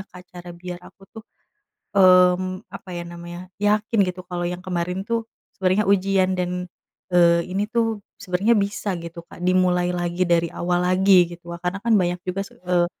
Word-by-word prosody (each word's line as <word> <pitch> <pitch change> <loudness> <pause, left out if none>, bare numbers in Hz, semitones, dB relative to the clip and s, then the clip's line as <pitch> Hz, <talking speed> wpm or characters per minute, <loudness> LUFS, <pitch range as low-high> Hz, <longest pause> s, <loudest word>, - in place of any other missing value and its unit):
Kak 180 0 -12
cara 175 0 -9
biar 175 0 -7
aku - - -18
tuh, 220 0 -11 0.7
mmm, 185 0 +4
apa - - -10
ya 175 - -4
namanya 175 0 -8 0.2
yakin 210 +2 +1
gitu 180 0 -5
kalau 175 -1 -3
yang 180 +1 -6
kemarin 180 +1 -2
tuh 230 -1 -1 0.3
sebenernya 190 +2 +2
ujian 195 -1 +2
dan, 180 0 -2 0.5
eee, 170 -1 +5
ini 195 +2 0
tuh 225 -2 0 0.2
sebenernya 195 +5 +2
bisa 200 +1 -2
gitu 170 0 -8
Kak - - -14
dimulai 180 -1 +2
lagi 175 +1 -1
dari 170 -1 +2
awal 175 0 0
lagi 190 +2 +3 0.2
gitu 170 0 -13
wa - - -5
karena 180 +2 -2
kan 230 -1 +3
banyak 175 0 -1
juga 185 +2 -1
se - - -16
eee, 175 -1 +2
180 Hz, 175 wpm, -23 LUFS, 175-195 Hz, 0.7 s, eee